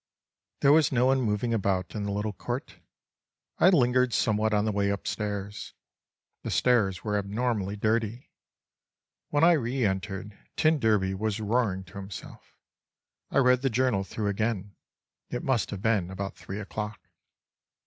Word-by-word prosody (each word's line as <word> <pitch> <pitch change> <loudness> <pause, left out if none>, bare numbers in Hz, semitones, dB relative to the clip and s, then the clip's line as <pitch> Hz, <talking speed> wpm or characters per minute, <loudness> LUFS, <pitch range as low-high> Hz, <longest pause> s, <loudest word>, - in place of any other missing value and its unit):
There 140 - +6
was 155 0 +5
no 125 -1 +3
one 135 0 +3
moving 110 +1 0
about 95 -4 0
in 105 -2 -3
the 100 - -2
little 105 +1 -2
court. - - -5 0.8
I 180 - +7
lingered 125 - +3
somewhat 110 0 +2
on 105 0 +2
the 110 - +1
way 100 -1 +1
upstairs. 100 0 -4 0.7
The - - -5
stairs 110 -7 +2
were 105 -1 0
abnormally 105 -1 -1
dirty. 110 +3 -1 1.0
When 145 +1 +1
I 170 - +8
reentered, 105 - -1 0.2
t 155 - +4
d 145 -8 0 0.3
was 105 +2 -2
roaring 105 -3 0
to 90 +1 -13
himself. 95 -4 -10 0.7
I - - -1
read 125 -1 +4
the 135 - +1
journal 125 -4 +1
through 105 +2 -3
again. 100 -1 -2 0.5
It 125 - -4
must 130 -6 +1
have 100 -1 -6
been 105 -6 +1
about 95 +1 -5
three 95 +3 -7
o'clock. 105 +1 -5
105 Hz, 150 wpm, -28 LUFS, 100-125 Hz, 1.0 s, I